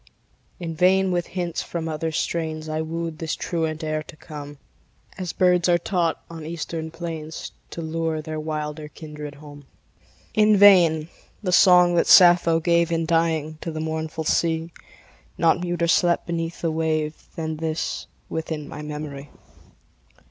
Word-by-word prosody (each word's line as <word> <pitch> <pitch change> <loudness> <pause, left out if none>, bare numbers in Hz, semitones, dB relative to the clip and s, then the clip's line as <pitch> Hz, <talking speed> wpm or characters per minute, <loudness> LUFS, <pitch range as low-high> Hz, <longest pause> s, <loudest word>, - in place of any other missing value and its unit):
In 170 -2 -4
vain 185 +2 +3
with 175 -1 -1
hints 175 -3 -3
from 165 -1 -4
other 160 +1 -2
strains 160 -1 -2
I 155 0 -2
wooed 165 0 -4
this 160 -1 -2
truant 160 -2 -2
air 155 0 -1
to 155 - -12
come 145 -2 -9 0.6
As 185 -3 -4
birds 180 -1 +3
are 175 - +5
taught 170 -1 -1
on 165 -2 -9
eastern 160 0 -5
plains 160 -2 -6 0.2
To 170 - -6
lure 160 0 -2
their 155 0 -5
wilder 150 0 -4
kindred 150 -1 -9
home. 145 -1 -13 0.7
In 215 -1 +5
vain: 175 -6 +6 0.3
the 185 - 0
song 180 -1 +6
that - - +3
Sappho 175 -2 +7
gave, 170 0 +2
In 165 -1 0
dying, 160 -2 0
to - - -4
the 155 - -5
mournful 160 0 -3
sea, 165 +1 0 0.7
Not 165 +1 +3
muter 175 -1 -1
slept 175 0 +3
beneath 165 0 -3
the 165 - 0
wave 155 -1 -2
Than 160 -1 -3
this 160 0 -3 0.2
within 160 -2 -4
my 150 - -8
memory. 150 -2 -6
160 Hz, 150 wpm, -23 LUFS, 155-170 Hz, 0.7 s, Sappho